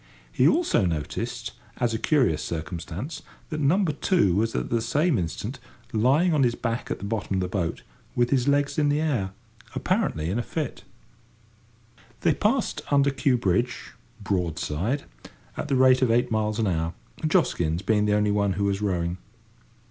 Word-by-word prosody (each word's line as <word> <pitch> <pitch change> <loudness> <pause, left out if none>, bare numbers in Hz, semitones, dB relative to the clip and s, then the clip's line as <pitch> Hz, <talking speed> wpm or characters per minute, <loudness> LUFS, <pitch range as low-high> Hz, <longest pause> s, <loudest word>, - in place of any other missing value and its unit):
He - - +4
also 315 - +3
noticed, 115 +10 -3 0.3
as 120 -2 0
a 110 - -1
curious 125 - +2
circumstance, 85 - -5 0.3
that 155 - -2
number 165 +4 +3
two 145 - +2
was 115 +3 0
at - - -2
the 115 -1 +2
same 145 - +1
instant 85 -3 -4 0.3
lying 135 +11 +3
on 150 - +3
his 120 -3 +3
back 115 -1 -3
at - - -2
the 100 - -7
bottom 105 -2 -2
of - - +1
the 90 - -1
boat, 90 -3 -2 0.3
with 120 0 +2
his 130 -2 +2
legs 145 +1 +2
in 145 -1 +3
the 145 +1 +2
air, 135 -12 0 0.5
apparently 80 +2 0
in 110 - 0
a - - +1
fit. 150 +2 -4 1.4
They 165 - +3
passed 220 - 0
under 140 -1 +4
Kew 135 -1 +2
Bridge, 120 +3 -1 0.3
broadside, 90 - -1 0.5
at - - -4
the 140 - +1
rate 130 0 +5
of 130 - +3
eight 120 +2 +2
miles 110 -1 0
an 115 - +1
hour. 85 -3 -1 0.3
Joskins 90 - +1
being 105 +1 +2
the 105 0 +2
only 105 0 +2
one 100 -1 +1
who 100 +3 -2
was 100 0 0
rowing. 90 -3 -1
115 Hz, 170 wpm, -25 LUFS, 95-140 Hz, 1.4 s, rate